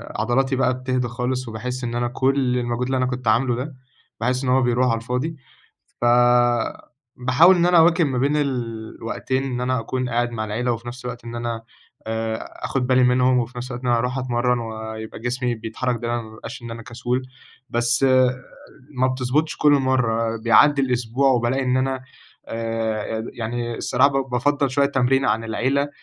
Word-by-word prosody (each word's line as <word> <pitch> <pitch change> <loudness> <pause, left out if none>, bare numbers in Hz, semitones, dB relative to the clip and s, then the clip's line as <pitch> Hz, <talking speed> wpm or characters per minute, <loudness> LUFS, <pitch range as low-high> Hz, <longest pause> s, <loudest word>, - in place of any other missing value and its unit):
عضلاتي 130 +2 +1
بقى 130 -1 +2
بتهدى 130 -1 -1
خالص 125 +1 -3
وباحس 125 +3 -5
إن 120 -1 -3
أنا 120 0 0
كل 130 0 +1
المجهود 120 0 -1
اللي 130 +1 0
أنا 130 - +1
كنت 125 -2 -4
عاملُه 120 +3 +3
ده، 130 +3 -5 0.4
باحس 125 +3 0
إن 125 - -1
هو 130 +1 +4
بيرُوح 125 +1 +2
على 115 -2 +2
الفاضي. 125 +7 -3 0.7
ف - - +1 1.1
باحاول 140 +9 +5
إن 175 -1 +2
أنا 180 -1 +5
أواكب 165 +1 +5
ما 135 -3 -1
بين 140 +4 +1
الوقتين 120 -1 -3
إن 125 -2 -3
أنا 130 0 0
أكون 125 +2 -3
قاعد 120 0 0
مع 110 -2 -3
العِيلة 115 +4 -1
وفي 115 0 -5
نفْس 125 +1 -8
الوقت 125 -1 -6
إن 115 - -6
أنا، 115 -1 -3 0.5
آآ، 110 0 -2 0.3
آخد 130 -2 -1
بالي 130 0 +4
منهم 125 +1 +4
وفي 120 +1 -4
نفْس 125 +2 -5
الوقت 120 +1 -6
إن 125 - 0
أنا 120 -1 +3
أرُوح 125 +2 -1
أتمرن 125 -1 0
ويبقى 110 -1 -6
جسمي 125 +1 -1
بيتحرك 115 +3 -3
دايمًا 120 0 -1
ما 110 -1 -12
يبقاش 110 - -9
إن 120 -1 -7
أنا 115 0 -7
كسول، 120 +2 -3 0.5
بس، 120 +3 +1 0.9
ما 130 0 +2
بتضبطش 130 +4 -1
كُلّ 150 - +4
مرة، 115 -4 +1
بيعدِّي 140 +5 +5
الأسبوع 125 +1 +1
وبالاقي 125 +2 +1
إن 130 0 +1
أنا، 130 0 -1 0.4
آآ، 115 -2 -2 0.3
يعن 115 0 -4
يعني 120 -1 -3
الصراحة 130 +3 +3 0.2
ب 135 - -17
بافضَّل 140 +2 +1
شوية 140 +2 +2
تمرين 135 0 +2
عن 110 +2 +1
العِيلة، 135 +5 0
125 Hz, 180 wpm, -22 LUFS, 115-130 Hz, 1.1 s, باحاول